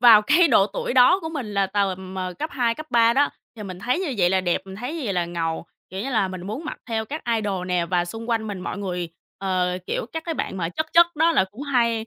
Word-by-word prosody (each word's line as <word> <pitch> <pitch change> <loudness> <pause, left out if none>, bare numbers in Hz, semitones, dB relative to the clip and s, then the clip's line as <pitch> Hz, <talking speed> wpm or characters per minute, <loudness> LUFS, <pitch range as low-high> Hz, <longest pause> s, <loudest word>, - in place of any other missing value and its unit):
Vào 230 -3 +8
cái 320 +8 +5
độ 200 -6 +5
tuổi 210 - -3
đó 260 +10 +6
của 320 - -4
mình 260 -10 -5
là 200 -1 +2
tầm, 190 -1 -2
ờ, 185 -1 -3
cấp 310 +2 -3
2, 240 -4 +1
cấp 310 +3 -8
3 230 -1 +5
đó, 285 +3 +3 0.3
thì 210 - -7
mình 185 -2 -7
thấy 250 - 0
như 305 -9 -2
vậy 175 -2 +4
là 190 0 +3
đẹp, 175 -2 0
mình 190 0 -9
thấy 250 +8 -5
như 335 - -4
vậy 200 - -1
là 175 -1 +1
ngầu, 165 -1 -3 0.2
kiểu 190 - -5
như 265 +6 -3
là, 220 -6 +2
mình 185 -1 -7
muốn 220 +11 -5
mặc 305 - -5
theo 220 -1 -1
các 300 +8 -6
idol 195 -4 -2
nè 180 -2 0
và 175 0 +1
xung 225 +6 -7
quanh 225 -1 0
mình 200 -3 -5
mọi 195 - -4
người, 180 -3 -3 0.3
ờ, 185 -1 0
kiểu - - -2
các 320 0 -4
cái 330 -2 -2
bạn 190 - -3
mà 165 -2 -1
chất 315 - -2
chất 340 0 +8
đó 325 +2 +4
là 275 - +4
cũng 225 +8 -9
hay 235 -5 +1
210 Hz, 280 wpm, -23 LUFS, 185-260 Hz, 0.3 s, Vào